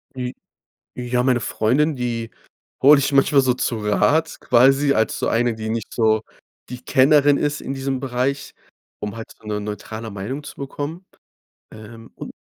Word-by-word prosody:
Die 125 Hz, -1 st, -4 dB, 0.6 s
ja, 125 Hz, 0 st, 0 dB
meine 125 Hz, -1 st, +2 dB
Freundin, 140 Hz, +9 st, +1 dB
die 120 Hz, -3 st, -3 dB, 0.5 s
hole 145 Hz, +2 st, +8 dB
ich 140 Hz, +1 st, 0 dB
manchmal 140 Hz, 0 st, +4 dB
so 130 Hz, -1 st, +2 dB
zu 120 Hz, -2 st, -2 dB
Rat 150 Hz, +10 st, +1 dB
quasi 135 Hz, +3 st, +4 dB
als 110 Hz, 0 st, 0 dB
so -, -, -1 dB
eine, 120 Hz, 0 st, +1 dB
die 110 Hz, 0 st, -6 dB
nicht 115 Hz, -1 st, -4 dB
so 110 Hz, -2 st, +2 dB, 0.5 s
die 125 Hz, 0 st, -8 dB
Kennerin 145 Hz, +2 st, +4 dB
ist 145 Hz, +1 st, -1 dB
in 135 Hz, -, -5 dB
diesem 135 Hz, -1 st, -3 dB
Bereich, 135 Hz, +2 st, -2 dB, 0.4 s
um 105 Hz, +1 st, -5 dB
halt 115 Hz, -, -8 dB
so 110 Hz, -, -18 dB
'ne 105 Hz, -1 st, -2 dB
neutrale 110 Hz, +2 st, -6 dB
Meinung 105 Hz, +9 st, -5 dB
zu -, -, -10 dB
bekommen. 145 Hz, +5 st, -6 dB, 0.7 s
Ähm, 115 Hz, +1 st, -12 dB
und -, -, -8 dB
125 Hz, 165 wpm, -21 LUFS, 110-140 Hz, 0.7 s, hole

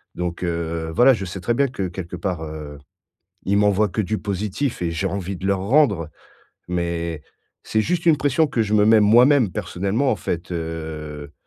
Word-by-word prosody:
donc, 90 Hz, 0 st, -4 dB
heu, 85 Hz, -1 st, -2 dB
voilà, 130 Hz, +2 st, +6 dB
je 105 Hz, -5 st, -3 dB
sais 90 Hz, +2 st, -6 dB
très 90 Hz, +7 st, 0 dB
bien 140 Hz, +4 st, +2 dB
que 100 Hz, -8 st, -3 dB
quelque 90 Hz, 0 st, -7 dB
part, 90 Hz, -2 st, -3 dB
heu, 75 Hz, -2 st, -8 dB, 0.7 s
ils 100 Hz, -, +1 dB
m'envoient 105 Hz, 0 st, +3 dB
que 110 Hz, -, -1 dB
du 105 Hz, +2 st, -2 dB
positif 105 Hz, +6 st, -3 dB
et 85 Hz, -, 0 dB
j'ai 85 Hz, +4 st, -2 dB
envie 95 Hz, 0 st, -4 dB
de 95 Hz, -, -6 dB
leur 100 Hz, -1 st, +1 dB
rendre, 100 Hz, -, +2 dB, 0.6 s
mais 85 Hz, -3 st, -2 dB, 0.4 s
c'est 110 Hz, -, 0 dB
juste 175 Hz, +6 st, -1 dB
une 160 Hz, -2 st, +6 dB
pression 145 Hz, +3 st, +2 dB
que 125 Hz, -4 st, -1 dB
je 105 Hz, 0 st, -1 dB
me 105 Hz, -1 st, +5 dB
mets 110 Hz, 0 st, +6 dB
moi-même, 120 Hz, +1 st, +5 dB
personnellement. 100 Hz, -, -1 dB
En -, -, +1 dB
fait, 85 Hz, -1 st, -4 dB
heu 80 Hz, -3 st, -6 dB
95 Hz, 190 wpm, -22 LUFS, 85-110 Hz, 0.7 s, voilà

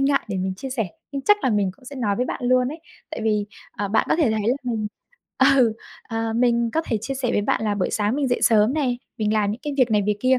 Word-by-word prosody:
ngại 275 Hz, 0 st, +3 dB
để 195 Hz, -, -2 dB
mình 185 Hz, 0 st, -2 dB
chia 265 Hz, +7 st, -7 dB
sẻ, 225 Hz, -6 st, -1 dB, 0.3 s
nhưng 275 Hz, -1 st, -3 dB
chắc 415 Hz, +6 st, +5 dB
là 260 Hz, -, +3 dB
mình 205 Hz, -3 st, +1 dB
cũng -, -, -21 dB
sẽ 280 Hz, +2 st, -9 dB
nói 205 Hz, -5 st, 0 dB
với 250 Hz, -, 0 dB
bạn -, -, -4 dB
luôn 250 Hz, 0 st, +3 dB
ấy. 310 Hz, +3 st, -7 dB, 0.3 s
Tại -, -, -5 dB
vì, 210 Hz, -2 st, +1 dB, 0.3 s
à, 205 Hz, -, -3 dB
bạn 220 Hz, +3 st, +2 dB
có -, -, +4 dB
thể 300 Hz, -10 st, +3 dB
thấy 215 Hz, -1 st, 0 dB
là 250 Hz, -, +3 dB
mình 225 Hz, -4 st, -2 dB, 0.7 s
ừ, 235 Hz, -4 st, +4 dB, 0.4 s
ờ, 225 Hz, -1 st, -2 dB
mình 235 Hz, 0 st, +2 dB
có 320 Hz, -, +2 dB
thể 225 Hz, -, -1 dB
chia 270 Hz, +6 st, -4 dB
sẻ 260 Hz, -2 st, -2 dB
với 205 Hz, -, +2 dB
bạn 220 Hz, -, 0 dB
là 210 Hz, -1 st, +1 dB
buổi 185 Hz, -3 st, -1 dB
sáng 210 Hz, +2 st, 0 dB
mình 280 Hz, -3 st, 0 dB
dậy 245 Hz, -, 0 dB
sớm 220 Hz, +1 st, +4 dB
nè 260 Hz, -5 st, 0 dB, 0.2 s
mình 215 Hz, 0 st, +1 dB
làm 205 Hz, -2 st, +2 dB
những 220 Hz, +4 st, -5 dB
cái 295 Hz, -1 st, -3 dB
việc 255 Hz, -4 st, +3 dB
này 210 Hz, -1 st, +3 dB
việc 210 Hz, -1 st, +1 dB
kia. 255 Hz, 0 st, +3 dB
230 Hz, 285 wpm, -23 LUFS, 210-260 Hz, 0.7 s, chắc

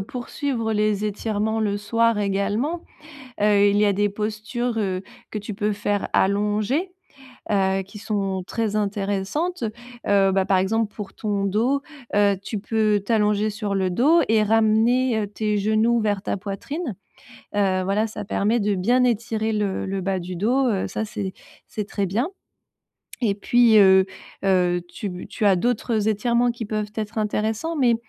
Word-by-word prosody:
heu, -, -, -2 dB
poursuivre 240 Hz, 0 st, -3 dB
les 210 Hz, 0 st, +1 dB
étirements 215 Hz, +1 st, -1 dB
le 205 Hz, -2 st, 0 dB
soir 230 Hz, +2 st, +1 dB
également, 205 Hz, -, -1 dB, 0.6 s
heu, 205 Hz, -1 st, +4 dB
il 200 Hz, -, +2 dB
y 210 Hz, -, +4 dB
a 200 Hz, -, +3 dB
des 205 Hz, +1 st, +1 dB
postures, 220 Hz, +3 st, -3 dB
heu, 190 Hz, -3 st, -1 dB, 0.3 s
que -, -, -3 dB
tu 210 Hz, +1 st, -5 dB
peux 210 Hz, +1 st, -1 dB
faire 205 Hz, 0 st, -1 dB
allongé, 210 Hz, -, +1 dB, 0.6 s
heu, 195 Hz, -1 st, +2 dB
qui 200 Hz, +3 st, -12 dB
sont 200 Hz, -3 st, -2 dB
très 220 Hz, -2 st, -2 dB
intéressantes, 205 Hz, -, -1 dB, 0.4 s
heu, 195 Hz, -1 st, +4 dB
bah, 190 Hz, 0 st, +2 dB
par 190 Hz, -, +3 dB
exemple 210 Hz, +3 st, 0 dB
pour 205 Hz, -3 st, -7 dB
ton 205 Hz, -2 st, -2 dB
dos, 240 Hz, +8 st, +1 dB, 0.3 s
heu, 200 Hz, -1 st, +4 dB
tu 210 Hz, +2 st, -4 dB
peux 210 Hz, 0 st, +1 dB
t'allonger 210 Hz, -1 st, +2 dB
sur 210 Hz, -1 st, -3 dB
le 190 Hz, -1 st, 0 dB
dos 300 Hz, -, +4 dB
et 220 Hz, -1 st, +4 dB
ramener, 225 Hz, +3 st, +3 dB
heu, 205 Hz, -, -2 dB
tes 210 Hz, +1 st, -1 dB
genoux 220 Hz, +3 st, +2 dB
vers 205 Hz, -3 st, 0 dB
ta -, -, -1 dB
poitrine, 210 Hz, -, -5 dB, 0.6 s
heu, 190 Hz, -2 st, +2 dB
voilà. 200 Hz, +3 st, +1 dB
Ça 220 Hz, -2 st, -6 dB
permet 215 Hz, +3 st, +1 dB
de 205 Hz, -1 st, +1 dB
bien 240 Hz, +7 st, +2 dB
étirer 225 Hz, -2 st, 0 dB
le 205 Hz, -3 st, -1 dB
le 195 Hz, 0 st, -2 dB
bas 190 Hz, 0 st, -1 dB
du 180 Hz, +1 st, -6 dB
dos, 250 Hz, +9 st, +2 dB
heu, 200 Hz, -4 st, 0 dB
ça 220 Hz, -, -3 dB
c'est 200 Hz, -3 st, -5 dB, 0.3 s
c'est 210 Hz, -2 st, -5 dB
très 200 Hz, -2 st, -1 dB
bien 225 Hz, -, -1 dB, 0.9 s
et 210 Hz, -5 st, +1 dB
puis, 230 Hz, +2 st, +4 dB
heu 190 Hz, -2 st, +7 dB, 0.4 s
heu, 180 Hz, -2 st, +3 dB
tu 200 Hz, +3 st, -6 dB
b 180 Hz, -1 st, -7 dB
tu 215 Hz, -, -3 dB
as 195 Hz, -2 st, +5 dB
d'autres 225 Hz, 0 st, 0 dB
étirements 235 Hz, +3 st, +2 dB
qui 235 Hz, 0 st, -6 dB
peuvent 210 Hz, 0 st, -3 dB
être 215 Hz, 0 st, -4 dB
intéressants. 220 Hz, +8 st, -1 dB
Mais 250 Hz, -6 st, +3 dB
210 Hz, 170 wpm, -23 LUFS, 200-225 Hz, 0.9 s, heu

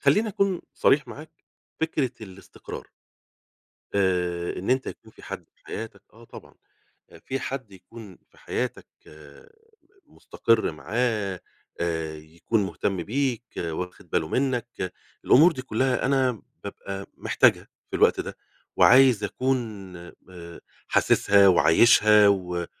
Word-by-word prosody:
خلّيني 215 Hz, +2 st, +3 dB
أكون 200 Hz, -3 st, 0 dB
صريح 140 Hz, -2 st, +3 dB
معاك، 150 Hz, +6 st, -10 dB, 0.5 s
فكرة 150 Hz, -6 st, 0 dB
الإستقرار، 95 Hz, -3 st, -10 dB, 1.1 s
آآ 90 Hz, -3 st, 0 dB
إن 95 Hz, +7 st, -3 dB
أنت 130 Hz, 0 st, +1 dB
يكون -, -, -9 dB
في -, -, -18 dB
حَد -, -, -7 dB
في -, -, -33 dB
حياتك، 115 Hz, 0 st, -7 dB
آه 115 Hz, +2 st, -17 dB
طبعًا، -, -, -14 dB, 0.7 s
في 135 Hz, 0 st, -3 dB
حَد 130 Hz, -6 st, -5 dB
يكون 100 Hz, 0 st, -13 dB
في -, -, -27 dB
حياتك 125 Hz, -1 st, -4 dB, 1.2 s
مستقر 115 Hz, -6 st, 0 dB
معاه، 100 Hz, -, -2 dB, 0.4 s
آآ 80 Hz, -2 st, -2 dB
يكون 85 Hz, +8 st, -2 dB
مهتم 95 Hz, -2 st, -3 dB
بيك، 125 Hz, 0 st, -1 dB
وأخد 90 Hz, +3 st, -5 dB
باله 80 Hz, -2 st, 0 dB
منّك، 120 Hz, -7 st, -2 dB, 0.3 s
الأمور 165 Hz, +7 st, +6 dB
دي 130 Hz, -4 st, -6 dB
كلّها 130 Hz, +1 st, 0 dB
أنا 130 Hz, -5 st, +1 dB, 0.2 s
بابقى 100 Hz, 0 st, -7 dB
محتاجها -, -, +2 dB, 0.2 s
في -, -, -3 dB
الوقت -, -, +3 dB
ده، -, -, -5 dB, 0.4 s
وعايز 125 Hz, -4 st, +6 dB
أكون 110 Hz, -7 st, -3 dB, 0.3 s
آآ 85 Hz, -2 st, -11 dB, 0.3 s
حاسسها، 100 Hz, -1 st, +4 dB
وعايشها، 105 Hz, +4 st, +6 dB
و 90 Hz, -3 st, 0 dB
105 Hz, 120 wpm, -25 LUFS, 90-130 Hz, 1.2 s, الأمور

